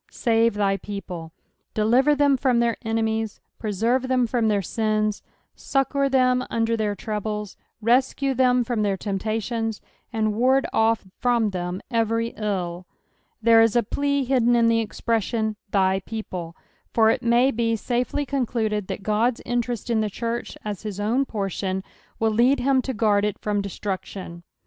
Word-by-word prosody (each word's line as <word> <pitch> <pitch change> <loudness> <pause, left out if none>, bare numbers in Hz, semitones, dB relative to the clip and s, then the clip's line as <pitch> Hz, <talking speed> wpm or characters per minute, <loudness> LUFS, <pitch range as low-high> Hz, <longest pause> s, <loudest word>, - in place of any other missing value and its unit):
" - - -34 0.2
Save 230 -2 +3
thy 200 -1 +1
people." 180 -6 -7 0.4
Deliver 245 +7 +4
tbem 285 -2 +3
from 250 -3 +2
their 235 -1 +2
enemies, 225 -1 -1 0.2
preserve 230 +5 0
them 255 -1 +2
from 235 -1 0
their 205 -2 +1
sins, 215 +1 0 0.3
succour 275 0 0
them 255 -1 +3
under 230 0 +1
their 210 -2 -1
troubles, 210 -1 -4 0.3
rescue 265 +4 +2
tbem 250 -1 +3
from 230 -2 -1
their 200 -2 +1
temptations, 220 +3 -2 0.3
and 215 -2 0
ward 260 +5 +3
off 225 -1 +2
from 235 -4 +2
tbem 180 0 -4
every 230 0 +1
ill. 185 -5 -3 0.6
There 230 0 +7
is 225 -1 +3
a 240 - +4
plea 280 +4 0
hidden 245 -2 +3
in 230 -1 +4
tbo 230 0 +3
expression, 220 0 -1
" - - -50
thy 190 -1 +2
people:" 185 -5 -6 0.4
for 225 -1 +4
it - - -1
ma^ 240 +2 +3
be 230 0 +1
safel;^ 250 +5 -1
concluded 225 -7 -1
that 200 - -6
Ood's 225 +3 +2
interest 240 -1 -2
in 220 -2 +2
the 215 - 0
church, 235 +3 -4
as 210 -2 -4
his 210 -3 -5
own 235 +7 +1
portion, 195 -3 -3 0.3
will 225 0 +1
lead 245 +5 +3
him 265 0 +3
to 260 -1 -4
guard 205 -1 +2
it 210 -1 -1
from 205 -1 -1
destruction. 190 -3 -5
225 Hz, 160 wpm, -24 LUFS, 210-245 Hz, 0.6 s, There